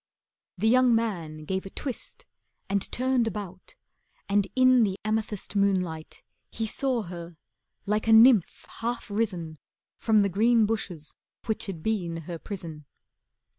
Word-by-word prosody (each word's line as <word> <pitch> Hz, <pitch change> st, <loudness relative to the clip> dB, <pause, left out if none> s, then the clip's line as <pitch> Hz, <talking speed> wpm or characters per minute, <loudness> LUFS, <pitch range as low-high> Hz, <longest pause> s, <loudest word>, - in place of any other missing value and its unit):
The 215 Hz, +5 st, +1 dB
young 250 Hz, 0 st, +5 dB
man 170 Hz, -9 st, -3 dB
gave 190 Hz, +3 st, -2 dB
a 195 Hz, -, -8 dB
twist 275 Hz, -, -6 dB, 0.4 s
And 200 Hz, 0 st, -1 dB
turned 255 Hz, -2 st, +1 dB
about, 190 Hz, -4 st, -7 dB, 0.5 s
and 200 Hz, 0 st, +2 dB
in 255 Hz, -1 st, +5 dB
the 195 Hz, -3 st, +1 dB
amethyst 215 Hz, -2 st, -2 dB
Moonlight 180 Hz, -5 st, -1 dB, 0.3 s
he 225 Hz, -, -3 dB
saw 250 Hz, +1 st, -1 dB
her 170 Hz, -2 st, -9 dB, 0.5 s
like 210 Hz, +2 st, -1 dB
a -, -, +4 dB
nymph 225 Hz, -3 st, +6 dB
half 235 Hz, -2 st, -3 dB
risen 180 Hz, -8 st, -2 dB, 0.4 s
From 215 Hz, -2 st, +3 dB
the 200 Hz, -, +1 dB
green 225 Hz, +4 st, +3 dB
bushes 195 Hz, -8 st, -4 dB, 0.3 s
which 220 Hz, -1 st, -2 dB
had 170 Hz, -5 st, -6 dB
been 180 Hz, -7 st, -1 dB
her 170 Hz, +1 st, -7 dB
prison. 165 Hz, -7 st, -8 dB
205 Hz, 135 wpm, -27 LUFS, 175-225 Hz, 0.5 s, nymph